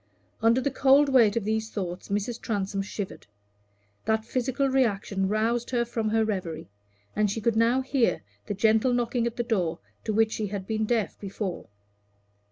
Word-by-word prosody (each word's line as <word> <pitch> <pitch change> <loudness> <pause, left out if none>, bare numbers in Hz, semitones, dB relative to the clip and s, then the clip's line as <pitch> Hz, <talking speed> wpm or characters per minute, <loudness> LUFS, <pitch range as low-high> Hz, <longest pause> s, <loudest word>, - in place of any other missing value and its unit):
Under 230 +3 +4
the 270 +2 -1
cold 275 +2 +5
weight 235 -6 +5
of 230 -4 -1
these 220 +1 -1
thoughts 180 -4 -5
Mrs. 210 +4 -2
Transome 200 -2 -2
shivered. 195 0 -6 0.8
That 220 0 +1
physical 260 +3 0
reaction 205 -7 +1
roused 225 +3 0
her 240 -2 +1
from 225 -2 -2
her 220 0 +2
reverie, 170 - -4 0.4
and 210 -1 +2
she 210 - -2
could 225 +1 +1
now 230 +3 +3
hear 265 - +1 0.2
the 205 - -2
gentle 220 +4 +3
knocking 240 0 0
at 235 - -4
the 240 - 0
door 180 -9 0 0.3
to 220 - 0
which 220 +1 +3
she 215 -2 -2
had 195 -1 -5
been 220 +1 -1
deaf 225 -2 -1
before. 195 -2 -5
220 Hz, 175 wpm, -27 LUFS, 205-240 Hz, 0.8 s, cold